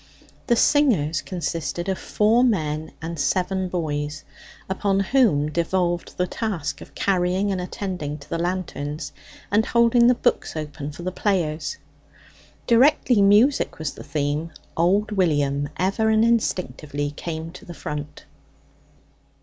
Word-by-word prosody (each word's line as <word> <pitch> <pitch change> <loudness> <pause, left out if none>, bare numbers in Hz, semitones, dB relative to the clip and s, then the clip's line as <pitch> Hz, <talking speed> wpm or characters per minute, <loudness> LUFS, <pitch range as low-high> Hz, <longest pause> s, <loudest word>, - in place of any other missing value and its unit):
The 240 - +4
singers 205 - +3
consisted 175 0 -3
of 190 -1 -1
four 220 +4 +3
men 155 -9 0
and 165 -1 -5
seven 185 +4 0
boys, 150 -4 -3 0.4
upon 195 +1 0
whom 195 - +2
devolved 175 +1 -1
the 180 - +2
task 190 -5 -3
of - - -13
carrying 190 +1 +1
and 185 -2 -1
attending 180 -5 -4
to 140 -1 -14
the 165 - -3
lanterns, 155 -5 -3 0.4
and 210 +2 +4
holding 235 +1 +4
the 250 - +5
books - - 0
open 150 -1 -5
for 160 +4 -9
the 185 - -2
players. 185 - -1 0.9
Directly 245 -2 +4
music 210 +8 +4
was 155 -2 -3
the - - -10
theme, 150 +2 -2 0.3
old 195 +6 +2
William 145 -7 +1
ever 195 +4 +1
and 220 +1 +4
instinctively 155 -10 -1
came 160 +2 -5
to - - -12
the 175 - -10
front. 150 -1 -6
180 Hz, 135 wpm, -23 LUFS, 150-205 Hz, 0.9 s, the